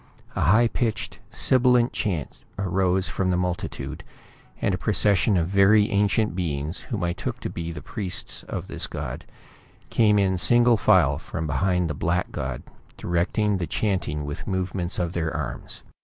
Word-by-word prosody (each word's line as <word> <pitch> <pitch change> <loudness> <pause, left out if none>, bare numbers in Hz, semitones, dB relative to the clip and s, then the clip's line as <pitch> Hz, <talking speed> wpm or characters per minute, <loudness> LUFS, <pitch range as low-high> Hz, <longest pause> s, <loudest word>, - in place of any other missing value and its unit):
A - - -1
high 110 +9 +5
pitched, 115 -1 -2
sibilant 125 -1 +3
chant 85 - -3
arose 95 -1 +1
from 90 +3 -1
the 90 - +2
multitude, 90 -1 -3 0.6
and 100 - +1
a - - 0
procession 100 0 +3
of 85 -1 +1
very 100 +2 +4
ancient 105 0 +2
beings, 80 -3 -2
whom - - -4
I 85 0 0
took - - -5
to - - -4
be 85 0 -4
the 80 -2 -8
priests 95 -5 -3
of - - -4
this - - -3
god, - - -6 0.7
came 105 -3 +4
in 95 -2 +2
single 120 +8 +5
file 75 -8 +4
from 80 - -5
behind 90 +4 +1
the 75 - -2
black 85 +5 -1
god, 65 -1 -4 0.3
directing 95 +4 0
the 85 -3 -3
chanting 85 -6 -1
with 75 0 -6
movements 95 -2 -2
of 85 -1 -1
their 80 -2 -1
arms. 75 -4 -5
90 Hz, 160 wpm, -25 LUFS, 85-105 Hz, 0.7 s, high